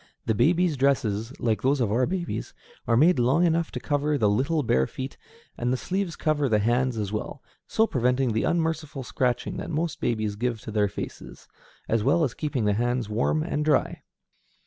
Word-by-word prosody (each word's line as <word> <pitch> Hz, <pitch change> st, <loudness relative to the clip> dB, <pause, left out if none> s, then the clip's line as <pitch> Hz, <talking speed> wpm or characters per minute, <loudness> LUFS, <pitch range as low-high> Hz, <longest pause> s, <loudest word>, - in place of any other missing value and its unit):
The 110 Hz, -, +1 dB
baby's 165 Hz, -, +2 dB
dresses, 120 Hz, -5 st, +1 dB
like 110 Hz, -3 st, 0 dB
those 135 Hz, +2 st, +2 dB
of 115 Hz, -5 st, +1 dB
our 125 Hz, +3 st, +2 dB
babies, 175 Hz, -1 st, -4 dB, 0.3 s
are 115 Hz, 0 st, +3 dB
made 155 Hz, +2 st, +5 dB
long 135 Hz, +9 st, +3 dB
enough 165 Hz, -1 st, +1 dB
to -, -, -3 dB
cover 145 Hz, 0 st, 0 dB
the 105 Hz, -5 st, +3 dB
little 145 Hz, +8 st, +1 dB
bare 65 Hz, -, +2 dB
feet; 130 Hz, +1 st, -6 dB, 0.4 s
and 120 Hz, +1 st, 0 dB
the 130 Hz, -, +1 dB
sleeves 185 Hz, +2 st, -2 dB
cover 150 Hz, -3 st, 0 dB
the 110 Hz, -, +3 dB
hands 120 Hz, +3 st, +1 dB
as 105 Hz, -2 st, -2 dB
well, 110 Hz, +5 st, -5 dB, 0.2 s
so 225 Hz, -, +3 dB
preventing 125 Hz, -, +1 dB
the 110 Hz, -, +1 dB
unmerciful 160 Hz, -4 st, -1 dB
scratching 125 Hz, 0 st, -1 dB
that -, -, -5 dB
most 160 Hz, 0 st, -2 dB
babies 110 Hz, -3 st, -1 dB
give 120 Hz, +1 st, -2 dB
to -, -, -7 dB
their 105 Hz, -1 st, +2 dB
faces, -, -, -8 dB, 0.4 s
as 115 Hz, -1 st, +1 dB
well 160 Hz, +7 st, +3 dB
as 130 Hz, -6 st, 0 dB
keeping 145 Hz, -7 st, -2 dB
the 105 Hz, -, +3 dB
hands 120 Hz, +1 st, -1 dB
warm 120 Hz, +8 st, +1 dB
and 150 Hz, -3 st, -2 dB
dry. 150 Hz, -2 st, +1 dB
130 Hz, 190 wpm, -26 LUFS, 115-155 Hz, 0.4 s, made